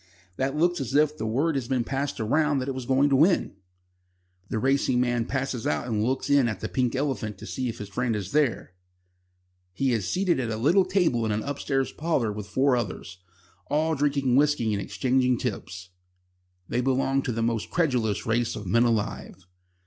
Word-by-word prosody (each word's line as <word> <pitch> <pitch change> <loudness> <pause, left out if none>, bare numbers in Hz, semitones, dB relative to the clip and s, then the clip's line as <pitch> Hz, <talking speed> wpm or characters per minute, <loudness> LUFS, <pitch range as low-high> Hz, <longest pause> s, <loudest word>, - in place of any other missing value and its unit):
That 135 +2 -1
looks 175 +1 +1
as 135 +1 -3
if 150 +1 +3
word 135 +9 0
had 130 -4 -3
been 130 -3 +1
passed 135 +2 -3
round 145 +6 +1
that 130 - -4
it 135 - -2
was 130 -2 -6
going 135 +2 +3
to - - +5
win." 160 - +3 0.9
The - - -2
racing 130 +1 +2
man 120 -2 +1
passes 135 -3 -2
out 75 - -1
and 110 -3 -1
looks 130 +3 -1
in 140 -3 +4
at 105 -5 -3
the - - -3
"Pink 125 -1 -1
Elephant" 125 -7 -2
to - - -10
see 130 -2 -3
if 115 - -6
his 105 - -7
friend 115 +3 -1
is 100 -3 -4
there. 140 -10 0 1.0
He 130 +7 0
is 105 -5 -1
seated 180 -5 +1
at 120 -3 -2
a 110 - -2
little 170 - +3
table 180 -11 +1
in 110 - 0
an 105 +1 -1
upstairs 135 -1 -2
parlour 150 -9 -1
with 105 -1 -6
four 130 +5 +2
others, 95 -5 -5 0.5
all 155 +2 +1
drinking 140 -3 +1
whisky 140 -6 +2
and 100 - -1
exchanging 125 +2 +1
tips. 95 -6 -5 0.8
They 125 - 0
belong 135 +1 +1
to 130 - -3
the 115 0 -2
most 115 -2 -1
credulous 125 - 0
race 115 +1 0
of 105 - -7
men 115 +6 +3
alive. 105 -4 -2
130 Hz, 195 wpm, -26 LUFS, 110-140 Hz, 1.0 s, to